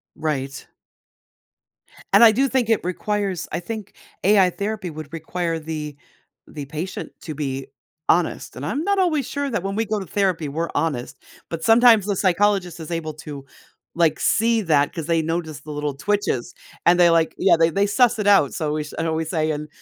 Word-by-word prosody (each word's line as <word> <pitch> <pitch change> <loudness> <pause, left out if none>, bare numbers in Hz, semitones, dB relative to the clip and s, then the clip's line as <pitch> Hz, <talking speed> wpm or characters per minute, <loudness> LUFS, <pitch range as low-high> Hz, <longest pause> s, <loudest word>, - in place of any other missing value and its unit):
Right. 140 -3 -3 1.5
And - - +8
I 225 - +9
do 265 +6 +2
think 255 -3 0
it 225 - +3
requires 195 +1 -2
I 170 - -2
think 210 +2 -7 0.3
AI 195 -1 +5
therapy 200 0 -4
would 155 -2 -9
require 165 +1 -3
the 155 -2 -5 0.5
the 145 -2 -7
patient 155 +7 -6
to 155 -4 -6
be 135 -2 -4 0.4
honest, 170 0 +1
and 130 - -6
I'm 270 - -2
not 400 -1 +2
always 310 -8 +1
sure 285 0 -2
that 210 -8 -2
when 195 0 -3
we 225 - +1
go 215 0 -1
to 195 - -6
therapy, 185 -6 0
we're 160 +4 -3
honest, 145 -5 -2 0.3
but, 165 -1 -5
sometimes 225 -1 +6
the 200 -1 -1
psychologist 190 -1 +1
is 160 - -8
able 165 -2 -3
to, 150 -2 -8 0.5
like, 165 -2 +2
see 230 0 +2
that 150 -6 +2
'cause 160 -3 -5
they 165 -1 +2
notice 160 -2 -3
the 150 +1 -10
little 150 -1 -3
twitches 170 -5 -1 0.3
and 175 +1 +6
they, 175 -1 +6
like 165 -1 +2
yeah, 190 - +4
they 165 0 +5
they 200 +4 +1
suss 235 +3 +3
it 210 - -1
out 195 -9 +5
so, 155 -2 -2
we 155 0 -2
sh 150 - -11
I 165 - -1
always 160 0 -2
say 155 -2 0
and 150 0 -4
170 Hz, 195 wpm, -22 LUFS, 155-205 Hz, 1.5 s, I